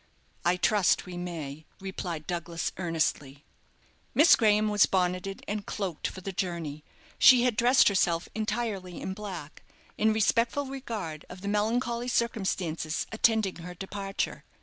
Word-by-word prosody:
"I 175 +2 +2
trust 200 +1 +3
we 180 -1 -8
may," 160 -4 -6
replied 180 -5 -5
Douglas, 170 -1 -3
earnestly. 155 -5 -1 0.7
Miss 310 +4 +8
Graham 215 -2 +3
was 210 -2 +4
bonneted 185 +1 -1
and 210 0 -2
cloaked 190 -7 -3
for 190 - -8
the 195 - -4
journey. 170 -5 -4 0.4
She 250 -2 +8
had 250 -3 +2
dressed 245 +4 +5
herself 175 -4 +2
entirely 215 -5 -3
in 190 - -4
black, 190 -7 -8 0.4
in 220 +1 +4
respectful 230 +6 +2
regard 220 - -5
of 180 +1 -10
the 200 - -5
melancholy 235 +3 0
circumstances 190 -10 -1
attending 220 -3 +2
her 180 +1 -8
departure. 195 +1 -4
195 Hz, 135 wpm, -28 LUFS, 175-220 Hz, 0.7 s, Miss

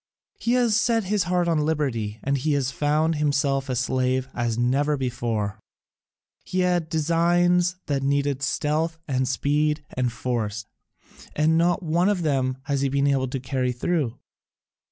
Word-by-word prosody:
He 245 +1 +2
set 225 +1 +2
his 195 -1 0
heart 175 0 +1
on 165 -2 +2
liberty, 125 -9 -1
and 140 +1 +1
he 150 +3 0
has 135 -2 0
found 150 +3 +1
himself 140 -2 0
a 130 - 0
slave 130 +1 0
as 120 -2 -1
never 140 +5 +1
before: 115 -5 -2 0.8
he 185 - -1
had 175 -3 +1
designs 175 +2 +2
that 140 -2 -1
needed 140 0 0
stealth 155 +4 0
and 130 -2 0
speed 150 +3 0
and 125 -1 0
force, 110 -3 -3 0.7
and 155 +2 +3
not 175 +3 +2
one 170 +4 +2
of 190 -4 0
them 130 -4 0
has 140 -2 -1
he 140 - +1
been 140 +1 +1
able 135 -2 +2
to 130 +1 -3
carry 130 0 -1
through. 130 -1 -1
145 Hz, 155 wpm, -24 LUFS, 130-165 Hz, 0.8 s, and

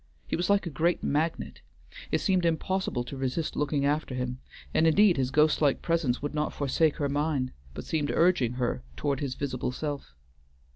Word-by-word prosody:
He - - -2
was 175 +3 -1
like 200 -1 +3
a 170 - -4
great 170 +5 +1
magnet: 160 +3 -1 0.5
it - - 0
seemed 185 -3 +2
impossible 170 -4 0
to 130 - -8
resist 135 +4 -2
looking 145 -1 0
after 145 -2 0
him, 125 0 -3 0.3
and 165 - +4
indeed 190 +3 +5
his 130 -2 0
ghost 150 +3 +3
like 145 -3 +2
presence 160 -7 0
would 145 - -2
not 150 0 -1
forsake 145 +2 +1
her 145 -3 -1
mind, 145 -2 0 0.2
but - - -6
seemed 150 -3 -1
urging 165 -9 +3
her 120 - -1 0.2
toward 140 - -1
his 135 -3 -3
visible 130 -3 -2
self. 145 - -5
145 Hz, 185 wpm, -28 LUFS, 130-165 Hz, 0.5 s, indeed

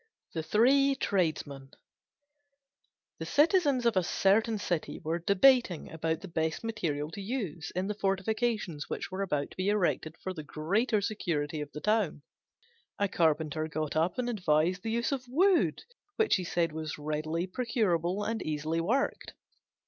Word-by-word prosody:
THE 160 - -2
THREE 270 - +4
TRADESMEN 155 - -1 1.5
The - - -4
citizens 295 -5 +3
of 235 - +3
a 185 - +4
certain 215 +5 +2
city 175 -5 -2
were 165 +2 -2
debating 200 - +3
about 160 0 -2
the 195 - -7
best 160 0 -2
material 160 -10 -2
to 200 - -7
use 195 - -4
in 185 +1 0
the 210 - -2
fortifications 200 -4 -1
which - - -4
were 190 +1 -3
about 150 -7 -1
to - - -15
be 185 +2 0
erected 175 -5 0
for 185 - -3
the 160 - -6
greater 200 - 0
security 160 -8 -2
of 145 - -6
the 150 - -7
town. 205 -7 +1 0.7
A 200 - +1
Carpenter 155 -3 +1
got 155 -1 -3
up 165 +3 +1
and 250 -1 -1
advised 180 -4 +1
the 225 - -4
use 235 +3 0
of 255 -2 -3
wood, 360 +8 +3 0.3
which 445 - +3
he 185 - -3
said 170 -1 0
was 155 -1 -5
readily 155 +3 -2
procurable 190 -4 0
and 225 +1 -2
easily 155 +2 -1
worked. 240 +11 -1
185 Hz, 155 wpm, -30 LUFS, 155-225 Hz, 1.5 s, THREE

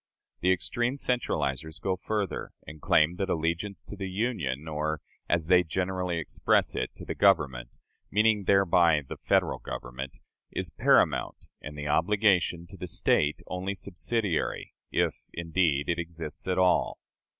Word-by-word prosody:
The 90 - +3
extreme 120 +8 0
centralizers 80 - -1
go 95 -1 0
further, 105 +1 -3
and 75 -1 -10
claim 80 +3 +3
that 95 0 -2
allegiance 85 +4 -1
to - - -9
the 95 -1 -4
Union, 90 - -2
or, 80 0 -2 0.3
as 85 -2 +2
they 90 +1 +6
generally 90 +1 -2
express 80 - +1
it, - - -1
to - - -10
the - - -3
Government 75 -12 +2 0.4
meaning 105 -1 +3
thereby 85 -6 +4
the - - -6
Federal - - +1
Government 65 +2 -6 0.3
is - - -4
paramount, - - +2 0.2
and 75 0 -8
the 75 0 -4
obligation 90 +1 +2
to 95 - -11
the 90 - -6
State 75 -2 +1
only 95 +2 -3
subsidiary 95 0 -2 0.2
if, - - 0
indeed, 80 -4 +1
it 85 0 0
exists 85 -2 -6
at 90 - 0
all. 90 -1 +3
85 Hz, 145 wpm, -28 LUFS, 80-95 Hz, 0.4 s, they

